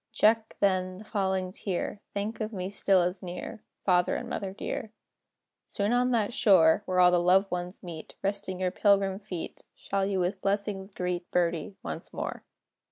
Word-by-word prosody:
Check, 220 +1 +3
then, 185 -2 +1
the 210 - -10
falling 190 -3 -1
tear; 195 +1 -3
Think 210 +3 -3
of 215 0 -2
me 190 -2 -4
still 195 -2 +3
as 180 +2 -2
near. 180 +3 -6 0.2
Father 180 -2 +3
and - - -4
mother 195 -2 -3
dear, 220 +3 -5 0.8
Soon 205 +3 0
on 250 +1 +3
that 230 -2 +1
shore, 185 -10 +5
Where 185 0 +1
all 180 0 +7
the 175 - +4
loved 185 +3 +4
ones 180 +2 -4
meet, 165 -3 -8
Resting 195 -2 -2
your 185 -1 0
pilgrim 195 -1 +3
feet, 180 -5 -6
Shall 195 -1 -1
you 195 -1 0
with 185 +2 -1
blessings 200 -1 -1
greet 180 -2 -3
"Birdie" 175 +2 0
once - - -6
more. - - -5
190 Hz, 170 wpm, -29 LUFS, 180-205 Hz, 0.8 s, all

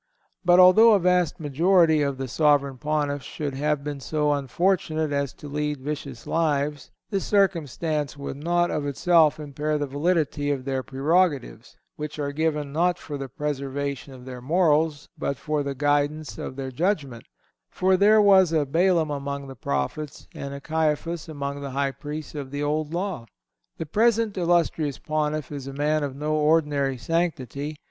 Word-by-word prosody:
But 175 0 +5
although 215 +5 +8
a 205 - +4
vast 180 -2 +2
majority 160 +2 +3
of 140 -2 -1
the 135 0 -4
Sovereign 140 0 +2
Pontiffs 145 -2 -1
should 145 -3 -5
have 150 +1 -1
been 145 -1 -4
so 150 +2 0
unfortunate 155 +2 0
as 140 -2 -1
to 150 - -11
lead 150 0 -2
vicious 140 -3 -6
lives, 150 -3 -1 0.2
this 195 -2 0
circumstance 160 - 0
would 140 -1 -6
not 175 +3 +1
of 145 -1 -2
itself 155 +1 +3
impair 150 +1 -2
the 145 - -1
validity 145 0 0
of 135 -3 -2
their 135 -1 -1
prerogatives, 140 - 0 0.2
which 150 0 -6
are 145 -1 -2
given 150 -2 -1
not 175 +2 +2
for 145 - -7
the 135 -1 -5
preservation 140 0 -4
of 125 -1 -12
their 125 -1 -8
morals, 155 0 +2
but 140 - -2
for 150 +1 -1
the 140 -1 -3
guidance 145 +2 0
of - - -6
their 135 -1 -5
judgment; 145 - -1 0.4
for, 185 0 +2
there 210 +3 +5
was 190 -4 +6
a 155 -3 +2
Balaam 165 +1 +2
among 140 0 -4
the 135 -1 -9
Prophets, 115 - -3
and 140 - -6
a 140 - -6
Caiphas 160 +2 -1
among 140 -2 -4
the 140 - -5
High 140 -1 +1
Priests 150 +3 -7
of 145 -3 -6
the 145 +1 -3
Old 150 +1 -1
Law. 175 -8 -3 0.5
The 165 - -4
present 225 +4 +2
illustrious 170 -5 +1
Pontiff 155 -2 -2
is 140 -2 -6
a 135 - -6
man 150 +2 0
of 140 -2 -4
no 150 +2 -2
ordinary 150 -3 +2
sanctity. 150 0 -2
150 Hz, 170 wpm, -25 LUFS, 140-165 Hz, 0.5 s, although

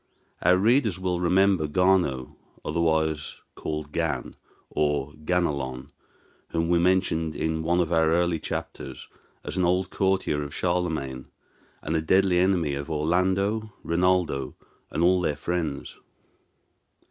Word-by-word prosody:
Our 90 +1 +5
readers 110 0 +3
will 90 -1 -1
remember 90 -1 +3
Gano, 85 -6 +1 0.3
otherwise 80 -1 0 0.2
called 75 -1 -5
Gan, 80 -6 -2 0.4
or 75 -1 0
Ganelon, 70 -7 -1 0.6
whom 85 0 -1
we 85 -1 +4
mentioned 85 -3 +1
in 80 0 -1
one 85 +2 +1
of 85 -1 0
our 80 -1 +4
early 85 0 +2
chapters - - -6 0.4
as - - -5
an 90 - +2
old 90 +1 +1
courtier 95 -6 +1
of 70 0 -6
Charlemagne, 80 -8 -2 0.6
and 80 - -2
a 80 - +2
deadly 95 +2 +3
enemy 90 -5 +2
of 70 +2 -5
Orlando, 95 +7 0
Rinaldo, 85 -6 +1 0.3
and 80 - -1
all 90 +1 +4
their 75 -4 0
friends. 80 -3 -3
85 Hz, 125 wpm, -26 LUFS, 75-90 Hz, 0.6 s, Our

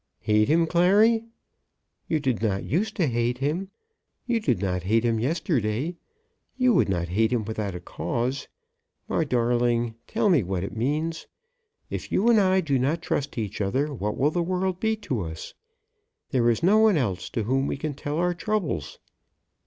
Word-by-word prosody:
"Hate 105 0 +3
him, 165 +2 +3
Clary? 205 +7 +4 0.8
You 160 - +1
did 130 -7 -1
not 100 -4 0
use 205 +9 0
to 180 - +1
hate 120 -1 0
him. 155 +8 -2 0.6
You 240 -2 +1
did 215 - +1
not 90 -2 -1
hate 110 +6 +1
him 115 -1 +1
yesterday? 135 - -1 0.6
You 255 -2 +4
would 180 - +3
not 85 -2 -1
hate 110 +5 +2
him 115 -4 0
without 105 -3 -3
a - - -5
cause. 120 +8 -3 0.6
My - - +1
darling, 120 -3 +1
tell 220 -1 0
me 170 -9 +4
what 95 -1 -3
it 100 - -6
means! 150 +8 -2 0.6
If - - -5
you 225 +5 +3
and 230 -2 +6
I 190 -1 +3
do 140 -6 0
not 155 +6 0
trust 140 -1 -2
each 105 -2 -3
other 135 +10 0
what 105 -4 -3
will 145 +3 +2
the 175 - 0
world 185 +1 -1
be 220 0 +1
to 120 -6 -1
us? 80 -2 -7 0.8
There 120 -2 +3
is 115 - 0
no 205 +5 +5
one 220 -5 +5
else 100 -10 -2
to 115 - -2
whom 135 +5 0
we - - -2
can 150 +1 -3
tell 145 +2 -4
our 175 +1 +1
troubles." 175 - -2
135 Hz, 180 wpm, -25 LUFS, 110-175 Hz, 0.8 s, and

